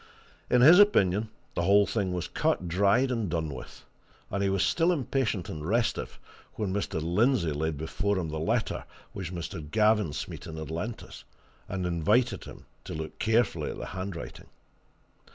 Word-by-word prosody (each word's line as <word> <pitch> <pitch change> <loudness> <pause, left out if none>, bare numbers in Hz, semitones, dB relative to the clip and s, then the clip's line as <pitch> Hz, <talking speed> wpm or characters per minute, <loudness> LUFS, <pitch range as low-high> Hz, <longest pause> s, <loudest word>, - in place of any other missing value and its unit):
In 125 0 +4
his 165 +8 +9
opinion, 105 - +4 0.2
the - - -1
whole 100 +3 +5
thing 100 -4 -1
was 90 -2 -2
cut, 90 - 0
dried, 100 +9 +3
and 115 -6 -1
done 80 -1 -1
with, 65 -1 -10 0.5
and 100 - -1
he 100 - +2
was 95 -1 +1
still 165 - +3
impatient 130 - -1
and 75 -1 -6
restive 115 +7 -1 0.4
when 100 -3 -2
Mr. 100 -4 -2
Lindsey 90 - +2
laid 75 +1 -2
before 95 +6 -1
him 85 -4 -2
the 80 0 -4
letter 110 +8 -1 0.3
which 95 -4 -5
Mr. 85 -2 -5
Gavin 105 -1 +3
Smeaton 80 +2 -6
had 80 -1 -6
lent 105 +8 -4
us, - - -12 0.5
and 95 -1 -2
invited 105 +9 +1
him - - -11 0.2
to - - -6
look 80 0 -6
carefully 115 +2 +1
at - - -6
the - - -5
handwriting. 95 -2 -6
95 Hz, 170 wpm, -28 LUFS, 85-110 Hz, 0.5 s, his